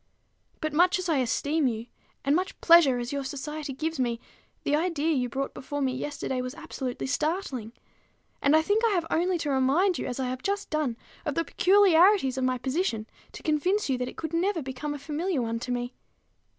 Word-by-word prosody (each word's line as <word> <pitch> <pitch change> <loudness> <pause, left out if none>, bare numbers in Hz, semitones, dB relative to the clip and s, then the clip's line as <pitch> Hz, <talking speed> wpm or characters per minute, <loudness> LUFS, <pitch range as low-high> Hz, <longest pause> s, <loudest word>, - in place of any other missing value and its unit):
But 310 -1 -2
much 355 +4 +4
as 370 0 -3
I 320 -4 +2
esteem 280 +4 +1
you, 225 -1 -3 0.4
and 280 +2 +3
much 370 +3 -2
pleasure 330 -7 +6
as 240 +2 -4
your 280 -1 -2
society 290 +2 -5
gives 310 +3 -3
me, 240 -2 0 0.4
the 290 - +2
idea 325 -1 +1
you 250 -3 0
brought 270 +3 -3
before 290 +2 -5
me 265 -2 0
yesterday 265 -2 -3
was 255 +2 -5
absolutely 260 -6 -5
startling; 280 - -2 0.7
and 285 +2 +4
I 315 - +5
think 415 +6 +1
I 455 -3 +3
have 345 -2 0
only 355 +2 +2
to 300 -3 -2
remind 280 +8 +2
you, - - -3
as 250 0 -4
I 260 - -1
have 255 0 -4
just 405 +1 -2
done, 300 -7 0 0.3
of 295 -4 -2
the 330 - 0
peculiarities 375 -6 +5
of - - -1
my 255 0 +1
position, 255 - -1 0.3
to - - -10
convince 360 +6 +1
you 255 - +1
that 250 0 -2
it - - -13
could 320 0 -5
never 345 -1 +1
become 270 +3 -4
a - - -5
familiar 300 +1 -2
one 230 0 -2
to 250 - -5
me. 245 0 -2
290 Hz, 205 wpm, -27 LUFS, 255-335 Hz, 0.7 s, pleasure